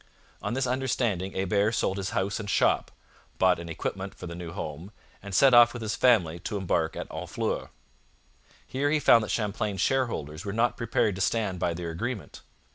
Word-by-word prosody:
On - - -2
this 135 0 0
understanding 120 -7 -1
Hebert 100 +4 +1
sold 95 - 0
his 95 -2 -2
house 100 +4 -1
and 105 -2 -5
shop, - - +2 0.5
bought 90 -2 +3
an 85 -1 -7
equipment 95 +4 -4
for - - -9
the 85 - -6
new 85 -1 -7
home, 80 +4 -6 0.3
and 100 - -8
set 135 -2 +6
off 120 0 +8
with 120 -2 -6
his 110 0 -2
family 90 -10 +3
to 105 +4 -4
embark 85 -4 0
at - - -5
Honfleur. - - -3 1.0
Here 140 +3 -1
he 155 +1 +2
found 115 -5 +6
that 110 - -5
Champlain's 105 -2 -2
shareholders 100 - -1
were 100 - -4
not 115 +2 +2
prepared 115 -3 +1
to - - -3
stand 95 -2 0
by 85 -1 0
their 85 -1 -4
agreement. 110 +5 -5
100 Hz, 190 wpm, -27 LUFS, 90-120 Hz, 1.0 s, off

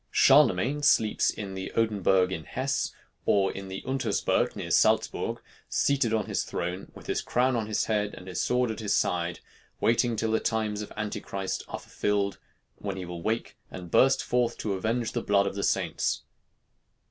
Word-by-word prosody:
Charlemagne 135 0 +4
sleeps 110 -7 +3
in 100 -3 -4
the 95 0 -5
Odenberg 95 -4 +2
in 80 -4 -4
Hess, 135 +2 -1 0.4
or 100 -1 +3
in 95 0 -7
the 95 0 -6
Untersberg 130 -6 0
near - - -5
Salzburg, - - +2 0.3
seated 135 -5 +2
on 110 -2 +1
his - - -1
throne, 90 +2 -4
with - - -12
his - - -1
crown 125 +1 +1
on 110 -2 -1
his 110 - 0
head 105 -2 -1
and 90 - -11
his 90 - -2
sword 125 -1 +1
at 110 - -6
his 105 -2 0
side, 85 -1 0 0.4
waiting 115 +1 +2
till 110 0 -1
the 110 - +2
times 110 -2 -1
of 105 - -7
Antichrist 105 -2 -3
are - - -5
fulfilled, 100 -1 -1 0.4
when 100 -2 -4
he 95 - -5
will 85 -1 -7
wake 110 +5 -2
and 90 -2 -9
burst 135 +1 +4
forth 120 -1 0
to 105 - -2
avenge 115 +5 -1
the 120 - -2
blood 100 -2 +3
of 100 - -2
the 100 - -3
saints. - - 0
105 Hz, 180 wpm, -28 LUFS, 95-115 Hz, 0.4 s, Charlemagne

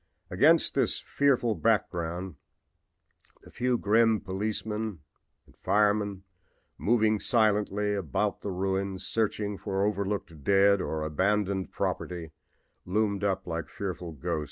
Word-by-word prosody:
Against - - +4
this - - +1
fearful 130 -5 +1
background 90 -5 -1 1.1
the - - -15
few 125 0 0
grim 110 +1 +3
firemen 105 +2 -3 0.5
or - - -22
police, 105 0 +1 0.6
moving 110 -1 +2
silently 105 -2 +1
about 100 +2 -1
the - - -4
ruins, 95 0 -2
searching 105 -2 -1
for 100 -1 -1
overlooked 100 -6 -3
dead 100 +1 +4
or 80 -2 -2
abandoned 95 +4 0
property, 85 -3 -3 0.5
loomed 100 +1 0
up 95 -2 0
like 85 -1 -4
fitful 90 -4 -5
ghosts. 75 +2 -2
100 Hz, 110 wpm, -28 LUFS, 95-105 Hz, 1.1 s, Against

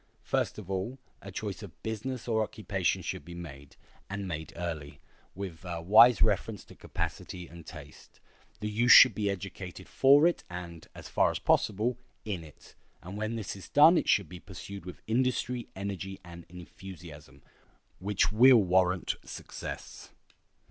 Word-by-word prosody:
First - - -1
of 105 -4 -8
all, 95 +7 -3 0.2
a - - -9
choice - - -5
of - - -12
business 115 +3 -4
or 110 -2 +1
occupation 100 -5 -1
should - - -4
be 85 +3 -10
made, 70 -5 -10 0.3
and 100 0 -4
made 80 -2 -5
early, 75 -5 -5 0.4
with 95 -3 -7
a 85 -2 -4
wise 110 +8 +7
reference 105 -1 0
to - - -14
capacity 90 -1 -5
and 85 -1 -13
taste. 75 -3 -12 0.4
The 105 - -2
youth 115 +4 +3
should 130 - +10
be 105 -2 -1
educated 95 -1 -6
for 140 +3 +5
it 175 - +1
and, 85 -2 -8
as - - -9
far - - +2
as - - -2
possible, 110 +4 +1 0.3
in 95 -6 -4
it; 75 -2 -16 0.3
and 90 +3 -8
when 110 +2 -3
this 110 -4 -5
is 95 - -11
done 155 +4 +7
it - - +1
should 100 -5 +3
be 90 +3 -10
pursued 95 0 -9
with 90 - -10
industry, 125 +1 0
energy, 95 0 -5
and 85 -1 -11
enthusiasm, 85 -6 -12 0.6
which 100 +2 +1
will 125 +4 +7
warrant 90 -2 +2
success. - - -8
95 Hz, 160 wpm, -29 LUFS, 85-110 Hz, 0.6 s, should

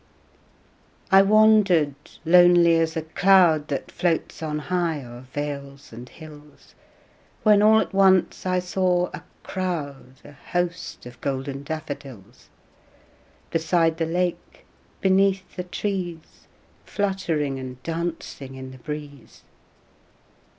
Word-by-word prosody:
I 195 0 +8
wandered 200 -7 +4 0.3
lonely 175 0 +6
as 165 0 -1
a 160 - -2
cloud 165 -2 +4
That 140 - -4
floats 170 -2 -2
on 155 -1 -3
high 165 -2 -2
o'er 120 +2 -12
vales 140 -2 -6
and 120 +2 -10
hills, 150 -2 -15 0.7
When 210 -2 +5
all 220 +1 +6
at 220 - -3
once 190 -2 +3
I 185 0 +1
saw 180 0 0
a - - -8 0.2
crowd, 145 -9 -5
A - - -12
host 175 +3 -4
of 125 -1 -12
golden 135 0 -3
daffodils: 140 -8 -8 1.0
Beside 165 0 +1
the 165 -1 -1
lake, 175 +1 -3 0.4
beneath 190 -1 +1
the 180 - -5
trees, 180 -3 -5 0.4
Fluttering 170 -9 -2
and 130 -1 -9
dancing 165 -5 -5
in 130 0 -9
the 130 - -13
breeze. 150 0 -9
165 Hz, 115 wpm, -24 LUFS, 140-180 Hz, 1.0 s, I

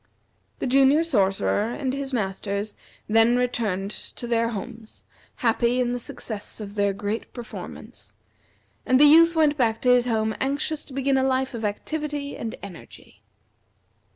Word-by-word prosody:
The - - -3
Junior 275 +4 +4
Sorcerer 205 -5 +1
and 260 0 -2
his 275 0 -3
Masters 200 -2 -2 0.3
then 225 +3 +4
returned 215 -6 -1
to 240 - -7
their 230 -1 +1
homes, 225 +1 -8 0.3
happy 240 +1 +1
in 245 -1 +1
the 245 - -2
success 220 -3 -5
of 205 -2 -7
their 200 -1 +1
great 205 +3 -4
performance; 240 -2 -9 0.7
and 255 0 +3
the 295 - +8
Youth 330 +3 +7
went 300 -2 +3
back 225 -4 +1
to 250 - +5
his 245 0 +3
home 220 -2 0
anxious 285 +3 -1
to 270 - -11
begin 270 0 +1
a 265 - +2
life 260 0 0
of 230 -1 -5
activity 290 +7 -3
and 225 -1 -5
energy. 190 -4 -12
240 Hz, 155 wpm, -24 LUFS, 215-270 Hz, 0.7 s, the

